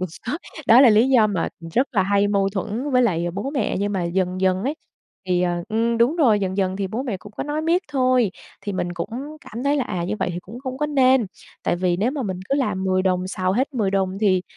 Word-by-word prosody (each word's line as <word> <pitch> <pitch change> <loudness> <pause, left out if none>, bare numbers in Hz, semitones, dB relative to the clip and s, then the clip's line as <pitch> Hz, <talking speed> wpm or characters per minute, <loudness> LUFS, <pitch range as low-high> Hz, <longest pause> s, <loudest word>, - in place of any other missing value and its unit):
có 185 - -1 0.6
đó 235 +3 +8
là 265 -4 +8
lý 220 +4 +4
do 245 -5 +5
mà 200 -5 -1 0.3
rất 255 +3 +3
là 200 -6 +3
hay 200 +1 +2
mâu 200 -1 +2
thuẫn 215 +8 -3
với 250 -1 +4
lại 175 -7 +1
bố 200 +9 -3
mẹ, 265 -7 -1
nhưng 205 +1 -1
mà 190 -3 -1
dần 180 +1 -1
dần 185 0 +2
ấy 275 +6 -1 0.5
thì, 180 -1 +1
à 175 -1 -1
ừm, 230 +1 0
đúng 245 +8 +3
rồi, 235 -11 +4
dần 190 -1 -2
dần 190 -1 0
thì 195 -1 -2
bố 220 +7 -3
mẹ 240 -7 -3
cũng 205 +3 -13
có - - -4
nói 295 +1 -2
miết 340 +3 +2
thôi, 255 -6 +2 0.3
thì 205 - -4
mình 175 -2 -2
cũng 170 +2 -4 0.3
cảm 235 +4 -7
thấy 285 +1 +2
là, 270 - 0
à, 180 -6 -3
như 190 +4 -2
vậy - - 0
thì 175 - -4
cũng 230 +6 -10
không 260 -1 -5
có 300 - 0
nên. 265 -5 +3 0.4
Tại - - 0
vì 175 -1 +1
nếu 215 +7 +1
mà 280 -1 -3
mình 190 -5 -4
cứ - - +1
làm 220 -9 -1
10 185 0 +1
đồng 185 -1 0
xào 185 0 -1
hết 265 +6 -1
10 210 -6 0
đồng 190 -1 -1
thì, 190 -4 +3
205 Hz, 260 wpm, -22 LUFS, 185-255 Hz, 0.6 s, đó